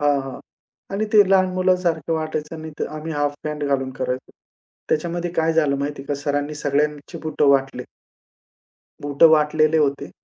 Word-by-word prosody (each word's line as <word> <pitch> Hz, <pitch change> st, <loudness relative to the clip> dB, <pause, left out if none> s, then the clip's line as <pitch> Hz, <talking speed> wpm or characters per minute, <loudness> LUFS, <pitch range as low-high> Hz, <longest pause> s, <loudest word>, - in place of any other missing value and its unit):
हां, 145 Hz, -1 st, +2 dB
हां. 135 Hz, -1 st, -8 dB, 0.5 s
आणि 215 Hz, +2 st, 0 dB
ते 210 Hz, -1 st, +8 dB
लहान 190 Hz, -1 st, +5 dB
मुलासारखं 175 Hz, -4 st, +1 dB
वाटायचं 155 Hz, 0 st, -3 dB
आणि 160 Hz, 0 st, -8 dB
ते -, -, -1 dB
आम्ही 160 Hz, +1 st, -5 dB
हाफ 145 Hz, -1 st, -1 dB
पँट 150 Hz, -1 st, -4 dB
घालून 135 Hz, -2 st, 0 dB
करायचो. 130 Hz, 0 st, -3 dB, 0.6 s
त्याच्यामध्ये 170 Hz, +2 st, -1 dB
काय 160 Hz, 0 st, +2 dB
झालं 150 Hz, -4 st, +2 dB
माहिती 140 Hz, 0 st, -4 dB
का 145 Hz, -, -2 dB
सरांनी 145 Hz, +1 st, -1 dB
सगळ्यांची 145 Hz, +1 st, -1 dB
बुटं 150 Hz, -2 st, +1 dB
वाटले. 135 Hz, -1 st, +1 dB, 1.2 s
बूटं 145 Hz, +3 st, +5 dB
वाटलेले 155 Hz, 0 st, +3 dB
होते 140 Hz, -1 st, 0 dB
150 Hz, 150 wpm, -22 LUFS, 140-160 Hz, 1.2 s, ते